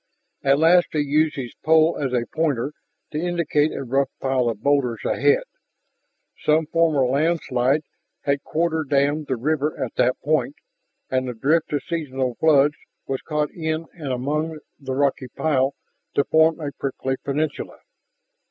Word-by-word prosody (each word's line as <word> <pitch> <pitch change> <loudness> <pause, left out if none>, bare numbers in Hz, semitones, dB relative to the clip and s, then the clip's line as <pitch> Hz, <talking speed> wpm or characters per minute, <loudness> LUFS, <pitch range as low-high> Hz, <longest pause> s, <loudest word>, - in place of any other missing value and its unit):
At 140 0 +3
last 170 +3 +5
he 155 - +1
used 150 +2 +2
his 125 -5 -5
pole 160 +1 +4
as 135 -3 -1
a 120 -2 0
pointer 145 -3 0 0.4
to 150 - -2
indicate 170 -4 +1
a - - -4
rough 135 +2 +1
pile 130 -2 +1
of 110 -2 -5
boulders 140 -5 +1
ahead. 465 +4 +3 1.0
Some 155 +1 +3
former 160 -4 +2
landslide 140 -1 +1 0.4
had 140 -1 0
quarter 160 0 0
dammed 145 +1 +1
the 130 - 0
river 150 +4 -1
at 130 - -3
that 125 +1 +2
point, 155 - 0 0.6
and 130 0 0
the 125 - -4
drift 155 +8 +1
of 145 - -1
seasonal 135 -6 -2
floods 145 -2 +4 0.3
was 135 -1 -3
caught 150 -1 -1
in 160 -1 -3
and 150 -6 -5
among 150 +5 -2 0.2
the 135 -2 -4
rocky 135 -1 0
pile 135 0 0 0.4
to 140 - +4
form 160 +2 +3
a 145 -3 -4
prickly 135 -1 -3
peninsula. 145 +2 -2
145 Hz, 150 wpm, -23 LUFS, 135-160 Hz, 1.0 s, last